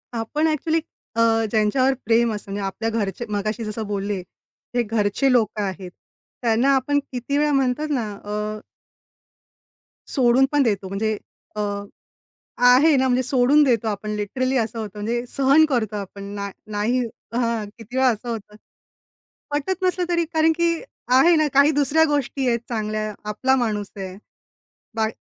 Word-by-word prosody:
आपण 295 +8 0
ॲक्चुअली 315 +1 +1 0.4
अ, 230 - +2 0.3
ज्यांच्यावर 245 +5 +2
प्रेम 230 0 +3
असतं 205 -1 -7
म्हणजे 200 +1 -3
आपल्या 215 +4 -2
घरचे 220 0 -2
मगाशी 215 +3 -2
जसं 215 0 -4
बोलले, 200 0 -2 0.6
हे 245 - +3
घरचे 220 +4 +1
लोकं 220 -3 +2
आहेत, 190 -2 -5 0.5
त्यांना 235 +3 +2
आपण 285 +2 +1
किती 255 +3 -2
वेळा 295 0 +2
म्हणतात 275 +2 +1
ना 225 -5 -2 0.2
अ 210 +1 -3 1.5
सोडून 255 -1 +4
पण 290 -1 +3
देतो 200 -5 0
म्हणजे 215 +2 -1 0.4
अ, - - -4 1.1
आहे 275 +5 +6
ना, 260 0 +2
म्हणजे 255 0 +2
सोडून 270 +3 +4
देतो 235 -4 +1
आपण 210 0 -3
लिटरली 255 +6 -1
असं 230 0 -1
होतं 215 -2 -4
म्हणजे 235 +3 -2
सहन 275 +3 +4
करतो 225 -6 -1
आपण, 200 0 -7
ना 200 0 -4 0.2
नाही 215 +4 0 0.4
हां, 230 -2 0
किती 230 +3 -9
वेळा 260 0 +4
असं 240 0 -2
होतं. 210 -2 -6 0.9
पटत 320 +6 -2
नसलं 365 -1 +1
तरी 340 -1 +1
कारण 320 +1 +4
की 340 +1 +1 0.4
आहे 335 +7 +6
ना 310 -1 +3
काही 280 +2 +6
दुसऱ्या 290 +3 +3
गोष्टी 275 -2 -1
आहेत 235 -1 +1
चांगल्या, 215 -2 -2 0.2
आपला 265 +5 +2
माणूस 210 -5 -1
आहे. 190 -1 -6 0.8
बा 220 -1 +1
235 Hz, 150 wpm, -22 LUFS, 210-275 Hz, 1.5 s, आहे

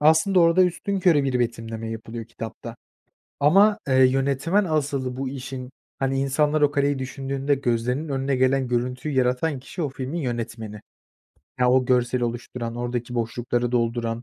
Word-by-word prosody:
aslında 160 +5 +4
orada 170 +2 +5
üstünkörü 180 -4 +1
bir 130 -2 0
betimleme 115 -2 -3
yapılıyor 115 0 -6
kitapta 115 +1 -8 0.6
ama, 200 +9 +5
eee, 130 - +1
yönetmen 140 +9 +1
asıl 140 -5 -1
bu 135 -1 -2
işin, 130 -1 -6 0.3
hani, 135 0 0
insanlar 150 +2 +1
o 145 0 +4
kaleyi 140 -1 +1
düşündüğünde 135 +2 -2
gözlerinin 125 +4 -1
önüne 135 0 0
gelen 130 0 +2
görüntüyü 125 +4 -2
yaratan 130 +3 +1
kişi, 155 +6 -7
o 145 - 0
filmin 135 +5 -4
yönetmeni. 115 -5 -4 0.8
Ya, 125 0 +4
o 130 0 +4
görseli 125 0 +1
oluşturan, 120 0 -4
oradaki 120 0 -3
boşlukları 120 +1 -1
dolduran 115 -1 -1
130 Hz, 145 wpm, -24 LUFS, 120-145 Hz, 0.8 s, orada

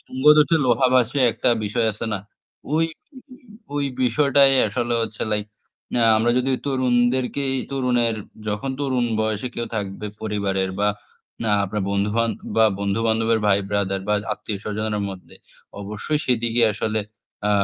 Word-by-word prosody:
'সঙ্গ 130 +1 -7
দোষে 155 +2 +4
লোহা 125 +2 +4
ভাসে' 130 +2 +3
একটা - - 0 0.2
বিষয় 110 +3 0
আছে 115 +2 -5
না? - - -2 0.6
ওই 165 +1 +3 0.9
উ 145 - -7
উ - - -1 0.3
বিষয়টাই 140 +2 +4 0.2
আসলে 120 +3 -1
হচ্ছে 110 -1 -4
লাইক 105 0 -1 0.5
না 120 - +2 0.2
আমরা 115 +2 +2
যদি 130 +1 0 0.2
তরুণদেরকেই 130 +1 +1 0.2
তরুণের 125 -4 +1 0.3
যখন 105 +6 -2
তরুণ 130 -3 0 0.2
বয়সে 110 +2 -1
কেউ 120 - -3
থাকবে 100 0 -4 0.2
পরিবারের 100 -3 -1
বা 105 - +3 0.6
না 110 - +1
আপনার 100 +1 -3
বন্ধু-বান্দ 105 +3 0 0.2
বা 110 - +6 0.2
বন্ধু-বান্ধবের 110 +2 +1
ভাই 100 -1 +4
ব্রাদার 95 -1 0
বা 105 - +3 0.2
আত্মীয় 105 -1 -5
স্বজনের 105 0 -2
মধ্যে 95 -1 -11 0.5
অবশ্যই 105 +9 -3
সেদিকে 120 -1 +1
আসলে 110 +1 -1 0.5
আ - - +2
115 Hz, 145 wpm, -22 LUFS, 105-125 Hz, 0.9 s, বা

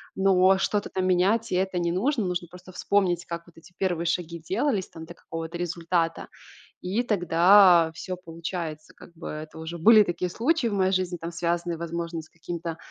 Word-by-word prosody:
но 190 0 +4
что-то 205 +1 -1
там 185 -1 -2
менять- 190 +5 +2
и - - +1
это 190 0 0
не 170 -1 0
нужно. 225 - 0
Нужно 180 -1 -3
просто 180 +1 -13
вспомнить, 180 -2 0
как 170 0 -6
вот 175 - -20
эти 165 +2 -17
первые 175 -3 -1
шаги 170 -1 -2
делались 200 - -1
там 160 0 -10
до 170 - -11
какого-то 165 0 -7
результата, 170 -1 -1 0.6
и 195 +6 0
тогда 180 -3 +5
всё 185 +3 -5
получается 165 -2 -6
как - - -15
бы. 165 - -7
Это 155 +1 -8
уже 160 +2 -6
были 215 +6 +7
такие 180 -2 -2
случаи 265 - 0
в 220 - -1
моей 190 -1 +2
жизни 185 -1 0
там, 170 0 -7
связанные, 170 0 -2
возможно, 170 0 -4
с 160 - -14
каким-то, 170 0 -6
175 Hz, 185 wpm, -26 LUFS, 170-190 Hz, 0.6 s, были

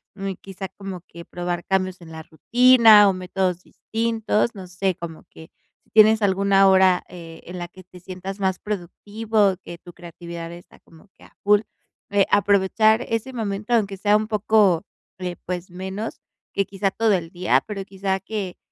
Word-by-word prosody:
Um, 195 -1 -4
quizá 195 0 -7
como 195 -2 -8
que 170 - -11
probar 175 0 -4
cambios 185 -1 -1
en 160 -1 -12
la 160 0 -8
rutina 230 +4 +6
o - - +1
métodos 185 -1 -2
distintos, 225 0 -1
no 190 -2 -9
sé, 185 +1 -2
como 165 -1 -9
que, 160 - -14 0.3
si - - -36
tienes 220 0 +6
alguna 195 0 +4
hora, 190 -1 +4
eh, 165 -2 -11
en 180 +1 -8
la 175 - -5
que 185 +2 -15
te 180 0 -15
sientas 185 +2 -7
más 190 -1 0
productivo, 210 +1 -1
que 170 - -9
tu 175 +1 -14
creatividad 170 -1 -9
está 175 +1 -14
como 165 +4 -21
que - - -20
a - - -19
full, 205 +1 +4 0.5
eh, 200 -1 +3
aprovechar 205 +3 +3
ese 230 +3 -2
momento 215 0 -3
aunque 200 -4 +1
sea 205 +2 +3
un 215 0 -3
poco 210 -5 +2 0.3
eh, 180 -1 -4
pues 180 0 -5
menos 190 +5 -6 0.3
que 200 - 0
quizá 195 0 -2
todo 220 0 +1
el 170 -3 -1
día, 180 -1 +1
pero 200 -2 -5
quizá 195 0 -2
que 195 -2 -5
195 Hz, 175 wpm, -22 LUFS, 180-210 Hz, 0.5 s, rutina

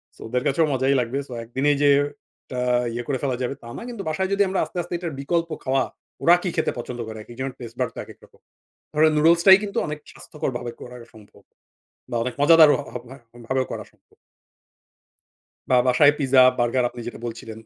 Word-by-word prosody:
So - - -18
ওদের 125 +2 -1
কাছেও 145 +4 +2
মজাই 135 +1 +2
লাগবে। 125 +2 -2
সো - - -14
একদিনেই 135 +5 0
যে 145 - +5 0.7
আ - - -1 0.3
ইয়ে 120 +1 -4
করে 140 -2 -1
ফেলা 130 -3 0
যাবে 125 - -2
তা 115 - -10
না। - - -7
কিন্তু 230 -5 -6
বাসায় 190 +5 -1
যদি 200 - +1
আমরা 190 0 -1
আস্তে, - - -11
আস্তে 175 +1 -8
এটার 170 -3 -5
বিকল্প 165 +3 -1
খাওয়া, 135 0 +1 0.4
ওরা 175 +1 +7
কি 180 - -1
খেতে 160 - 0
পছন্দ 120 0 -6
করে? 110 0 -7
একেকজনের 130 +4 -6
taste 120 -2 -9
bud - - 0
তো - - -7
একেক - - -14
রকম। - - -26 0.6
ধরেন 155 +1 +4
নুডলসটাই 170 +5 +6
কিন্তু 200 -1 -3
অনেক 150 0 -5
স্বাস্থ্যকর 150 - -5
ভাবে 120 0 -5
করা 125 0 -10 0.2
সম্ভব। 105 -2 -18 0.7
বা 120 - -2
অনেক 125 - -3
মজাদার 160 +1 +7
হ - - -2 0.3
ভা 135 - -11 0.2
হ - - -43
ভাবেও 130 +1 0
করা - - -5
সম্ভব। - - -32 1.5
বা 125 - +5
বাসায় 145 +3 +5
পিজ্জা, 135 -2 +4 0.2
বার্গার 120 +1 +1
আপনি 120 0 -9
যেটা 120 - -7
বলছিলেন 115 -1 -7
135 Hz, 200 wpm, -23 LUFS, 120-160 Hz, 1.5 s, ওরা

